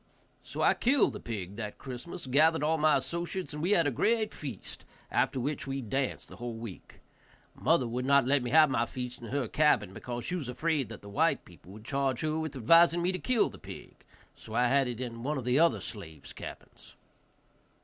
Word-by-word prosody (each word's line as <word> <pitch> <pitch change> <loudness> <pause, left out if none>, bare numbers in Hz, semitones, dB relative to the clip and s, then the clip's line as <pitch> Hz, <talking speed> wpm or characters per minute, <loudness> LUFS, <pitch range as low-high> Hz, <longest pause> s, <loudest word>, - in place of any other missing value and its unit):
So - - -4
I - - +6
killed 265 +1 +3
the - - -6
pig 100 -3 -6
that 105 -2 -5
Christmas, 135 +6 -7
gathered 150 +4 +3
all 155 +2 +2
of 160 - -1
my 155 -2 +5
associates, 170 +3 -4
and 150 +1 -5
had 180 -5 +4
a 145 - +2
great 220 - +1
feast, 130 -10 -7 0.3
after 130 - +1
which 140 +3 -3
we 135 0 -2
danced 130 +4 -2
the - - -12
whole 120 -1 -5
week. 115 -4 -10 0.5
Mother 150 -4 +2
would 125 +2 -3
not 140 -1 +5
let 140 +1 +3
me 125 - -3
have 155 +3 +7
my 120 -2 +1
feast 125 -1 -6
in 115 - -7
her 135 -1 -1
cabin, 105 -9 +2
because 120 +3 -6
she - - -3
was 160 -9 -3
afraid 145 -2 0
that 110 -3 -10
the - - -10
white 160 +10 +1
people 90 +1 -16
would 105 +1 -12
charge 135 -1 0
her 155 0 0
with 160 -3 -4
advising 165 +7 +5
me 180 - +2
to 185 - -4
kill 250 -3 +2
the - - -13
pig, - - -10 0.4
so 110 - -9
I 125 0 +3
had 135 0 +3
it 120 -2 -4
in 115 -2 -5
one 145 +4 -1
of 130 - -5
the 125 +3 +3
other 170 +1 +4
slave's 80 -9 -8
cabins. - - -11
135 Hz, 215 wpm, -30 LUFS, 120-160 Hz, 0.5 s, have